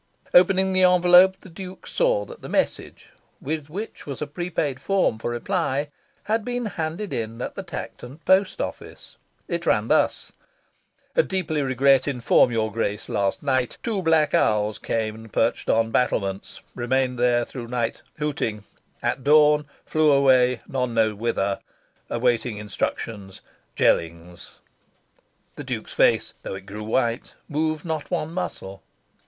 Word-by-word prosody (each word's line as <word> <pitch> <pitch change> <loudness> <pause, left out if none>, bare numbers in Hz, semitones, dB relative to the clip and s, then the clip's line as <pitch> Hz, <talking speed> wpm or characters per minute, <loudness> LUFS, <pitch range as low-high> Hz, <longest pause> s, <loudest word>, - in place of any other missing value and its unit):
Opening 190 +1 +5
the 185 - +3
envelope, 180 +1 +6
the - - -13
Duke 185 +2 -9
saw - - +1
that 475 0 -12
the - - -8
message, - - -2 0.3
with 155 -2 -4
which 200 +3 -7
was 140 - -5
a 150 - -2
prepaid 150 -3 -3
form 190 - +1
for 120 - -3
reply, 145 +2 -1 0.3
had 220 +1 0
been 245 +1 -3
handed 175 +1 -4
in 115 0 -4
at - - -4
the - - -5
Tankerton 125 +4 -8
post 190 - +3
office. - - -7 0.3
It - - -3
ran - - +2
thus: - - +1 1.0
Deeply 160 -5 -1
regret 135 0 +3
inform 125 -2 +3
your 110 -2 0
grace 105 -2 -3
last 100 +4 -1
night 130 -3 0
two 220 -5 -1
black 160 -3 +3
owls 105 0 +2
came 110 -1 -2
and 110 0 -12
perched - - 0
on 115 0 +2
battlements 100 -6 -1
remained 125 +1 0
there 120 -1 +3
through 120 -3 -8
night 120 -1 -2 0.2
hooting 135 -8 -2 0.4
at 130 - -1
dawn 150 0 +5 0.2
flew 155 -1 +3
away 130 -3 +4
none 125 -3 -2
knows 110 -1 +3
whither 100 -2 -1 0.5
awaiting 120 -2 0
instructions 105 -1 -4 0.3
Jellings 85 +1 -1 1.0
The - - -6
Duke's - - -4
face, - - +3
though - - -5
it 95 0 -9
grew 105 +2 -7
white, 115 +2 -1
moved 155 +1 -1
not 160 -3 -3
one 165 -2 -2
muscle. 95 - -5
135 Hz, 145 wpm, -24 LUFS, 115-165 Hz, 1.0 s, envelope